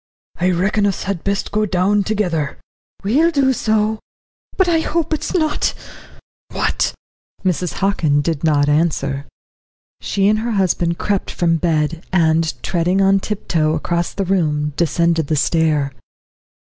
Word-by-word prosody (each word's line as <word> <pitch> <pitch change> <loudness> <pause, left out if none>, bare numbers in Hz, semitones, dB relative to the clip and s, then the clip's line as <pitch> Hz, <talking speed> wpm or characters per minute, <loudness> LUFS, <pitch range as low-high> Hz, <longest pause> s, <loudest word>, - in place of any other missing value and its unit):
"I 180 +1 +2
reckon 195 +4 +1
us 195 - -2
had 190 -3 -3
best 200 0 -2
go 215 0 +1
down 195 +2 +2
together." 180 -9 -1 0.5
"We'll 280 +12 +3
do 275 -5 +2
so 220 -2 0 0.6
but 380 - +3
I 335 -2 +3
hope 320 0 -1
it's 310 - -3
not 310 -4 +1 0.4
" - - -28
"What?" - - -1 0.5
Mrs. 180 -1 0
Hockin 160 -7 +1
did 160 -1 -2
not 145 -3 +3
answer. 145 -2 0 0.7
She 195 0 0
and 215 +1 +3
her 230 +1 -2
husband 175 -3 +1
crept 200 -2 -1
from 165 -1 +1
bed, 160 -1 0
and, 165 -2 +2
treading 180 +2 +1
on 195 0 +4
tiptoe 165 -7 -1
across 170 +2 -1
the 195 - -1
room, 150 -6 0
descended 170 -1 +1
the 155 - 0
stair. 150 -2 +1
180 Hz, 145 wpm, -19 LUFS, 160-205 Hz, 0.7 s, on